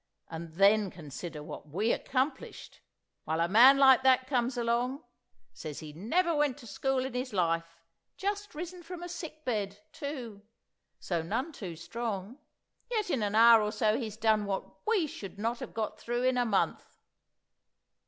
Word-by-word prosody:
And 165 0 -7
then 200 +2 +5
consider 155 -1 -8
what 150 - -9
we 205 +9 +1
accomplished! 265 +1 -3 0.4
While 160 +1 -1
a 170 - +2
man 245 +8 +8
like 265 -1 +7
that 260 -1 +4
comes 250 -1 0
along—says 235 - -4
he 150 -1 -9
never 330 - +1
went 295 -3 +1
to 265 - -13
school 265 +2 -1
in 265 - -5
his 250 -1 -3
life, 165 -2 0 0.4
just 410 0 -3
risen 350 +3 -6
from 350 0 -8
a - - -4
sick 315 -3 -8
bed, 205 -5 -2
too, 265 -9 -6 0.6
so 170 -3 -2
none 255 - -2
too 190 - -7
strong—yet 235 - -5
in 255 - 0
an 205 0 -1
hour 230 0 +8
or 210 0 -1
so 215 -1 +2
he's 220 -4 -4
done 215 -1 +2
what 195 -1 -2 0.2
we 425 -7 +3
should 200 -10 -8
not 230 +3 -2
have - - -8
got 220 -1 -3
through 240 +1 -2
in 255 0 +3
a 245 - +2
month. 205 -4 -1
235 Hz, 165 wpm, -30 LUFS, 195-270 Hz, 0.6 s, man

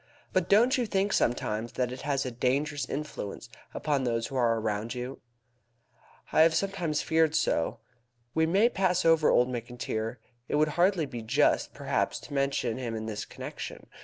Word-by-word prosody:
But 185 -2 +1
don't 245 +6 +5
you 240 - 0
think 195 0 +1
sometimes 115 -1 0
that 125 -1 -1
it 130 - -7
has 140 -2 -1
a 130 - -3
dangerous 140 +4 -1
influence 145 -9 -5 0.2
upon 145 -3 -1
those 115 -2 0
who 135 - -7
are 115 -3 +2
around 110 +2 -2
you?" 125 +2 -6 1.1
"I - - +5
have 160 0 +5
sometimes 175 -5 -1
feared 160 -1 +2
so." 80 - 0 0.5
"We 160 0 +2
may 195 +7 +4
pass 185 -5 +1
over 165 -2 +5
old 125 - +4
Mr. 125 -1 -5
McIntyre. 115 0 -3 0.3
It - - -1
would 150 +1 +3
hardly 175 +1 +2
be 125 -4 -6
just, 110 - +2
perhaps, - - -1
to 145 - -10
mention 135 -4 0
him 120 -3 -3
in 110 0 -4
this 105 -1 -4
connection. - - -8
140 Hz, 175 wpm, -29 LUFS, 120-165 Hz, 1.1 s, don't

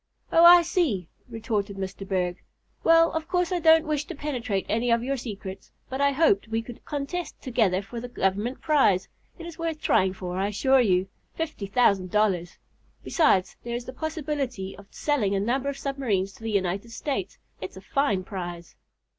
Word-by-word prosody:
"Oh, 330 - +6
I 345 0 +9
see," 290 - 0 0.2
retorted 215 -3 -3
Mr. 195 0 -5
Berg. 180 -2 -1 0.4
"Well, 330 0 +5
of 320 0 -3
course 360 -1 0
I 360 - +1
don't 320 0 +6
wish 300 -1 -1
to 345 - -7
penetrate 245 -9 -2
any 230 +3 0
of 235 0 +3
your 275 +2 -1
secrets, 200 -6 -7 0.2
but 265 +1 -2
I 280 0 +4
hoped 270 -9 +3
we 225 +1 -2
could 240 0 -11
contest 295 +5 -4
together 215 -7 +1
for 235 +4 -7
the 245 - -6
Government 215 +2 -1
prize. 265 - +3 0.3
It 340 - -9
is 340 0 -9
worth 330 -2 -2
trying 190 -8 +2
for 180 -1 -5
I 195 - +1
assure 260 +6 +3
you 190 -4 +2 0.3
fifty 315 -11 -4
thousand 200 -4 +2
dollars. 185 -4 +1 0.5
Besides, 195 - +2
there 235 0 -4
is 240 0 -5
the 255 - -7
possibility 280 - -3
of 200 - -14
selling 230 -10 0
a - - +1
number 255 +7 0
of 280 - -5
submarines 230 -10 -1
to - - -18
the 225 - -3
United 200 +1 -1
States. 225 -7 -3 0.2
It's 185 0 -7
a - - -9
fine 205 -5 0
prize." 175 -3 -7
235 Hz, 185 wpm, -26 LUFS, 195-290 Hz, 0.5 s, I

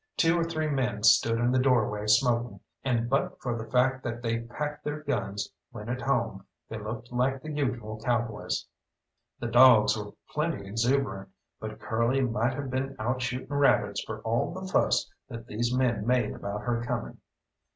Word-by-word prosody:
Two 165 0 +4
or - - +2
three 160 -1 -2
men 125 -7 -1
stood 115 +1 +5
in 120 +1 +2
the 130 - +3
doorway 110 -5 +2
smoking, 120 -1 +2 0.2
and 120 -3 +1
but 135 +3 0
for 120 -2 -2
the 115 -1 -6
fact 130 +1 +2
that 120 0 -4
they 115 0 0
packed 145 +6 -5
their 150 0 -3
guns 105 -8 -2 0.2
when 105 +2 -8
at 125 +1 -2
home, 120 -8 0 0.2
they 110 - -6
looked 110 +3 -6
like 130 +2 +1
the 155 - -5
usual 120 -7 -2
cowboys. 120 -4 -1 0.7
The - - -4
dogs 120 -2 +7
were 105 -1 -6 0.2
plenty 150 -9 -1
exuberant, 115 -3 0 0.3
but - - -7
Curly 115 +4 +1
might 120 0 0
have 140 -2 -4
been 135 +1 -2
out 125 +3 -1
shooting 125 +1 -3
rabbits 140 0 +3
for - - -6
all 115 +7 0
the 185 +2 -6
fuss 185 - +2 0.2
that 115 -2 -7
these 120 +1 -1
men 125 -4 +1
made 125 -3 +2
about 100 +1 -5
her 120 -1 -1
coming. 120 - -4
120 Hz, 175 wpm, -28 LUFS, 115-130 Hz, 0.7 s, dogs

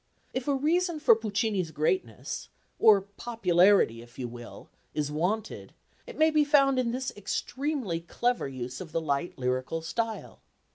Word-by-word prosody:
If 255 +1 -3
a 285 - +2
reason 335 +4 +1
for 295 - +6
Puccini's 205 -4 -1
greatness 155 - -2 0.3
or 210 -3 +7
popularity, 195 - +2
if 120 0 -16
you 125 - -3
will 120 0 -10 0.3
is 150 -1 -1
wanted, 190 +8 -2 0.3
it - - -9
may 315 0 +4
be 305 -1 +4
found 275 -3 +4
in 245 -2 +1
this 255 +2 -3
extremely 250 - -2
clever 240 - -1
use 130 0 -6
of 170 -4 -9
the - - +1
light 150 +2 -2
lyrical 130 +5 -2
style. 225 +6 -4
205 Hz, 150 wpm, -28 LUFS, 155-260 Hz, 0.3 s, or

